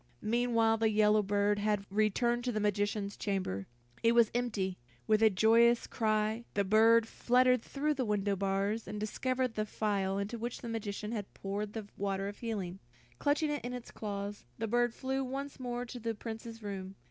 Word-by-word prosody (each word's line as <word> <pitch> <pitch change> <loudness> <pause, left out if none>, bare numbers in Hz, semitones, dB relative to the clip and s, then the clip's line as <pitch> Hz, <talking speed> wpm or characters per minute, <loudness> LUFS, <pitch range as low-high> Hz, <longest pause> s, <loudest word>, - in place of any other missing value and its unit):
Meanwhile 230 0 +2
the 225 0 +2
yellow 210 0 +4
bird 205 +1 +1
had 205 -1 0
returned 225 +4 +2
to 250 - +1
the 215 - -1
magician's 205 0 0
chamber. 185 - -2 0.3
It 230 0 +4
was 235 -2 +5
empty. 215 -6 -1 0.3
With 215 0 +3
a 220 - +7
joyous 230 +4 +4
cry, 215 +1 0
the 200 - +3
bird 225 +3 +5
fluttered 250 +1 +3
through 295 +5 -1
the 265 -3 -1
window 205 -2 +1
bars, 195 +3 -1
and 210 - -5
discovered 255 +3 -1
the 215 - -1
phial 195 -3 0
into 205 +4 -3
which 240 +2 -4
the 235 - -6
magician 210 -1 -4
had 210 -4 -4
poured 205 +1 -4
the 220 -2 -5
water 195 0 -1
of 205 - -7
healing. 195 -6 -4 0.4
Clutching 295 +1 +2
it 290 - -3
in 245 +1 -4
his 245 -2 -7
claws, 205 -1 -5
the 225 - -2
bird 240 +1 +1
flew 265 0 -1
once 275 +2 -5
more 245 -1 -3
to 245 +1 -8
the 230 0 -2
Prince's 225 +1 -7
room. 195 -1 -5
215 Hz, 180 wpm, -32 LUFS, 205-235 Hz, 0.4 s, a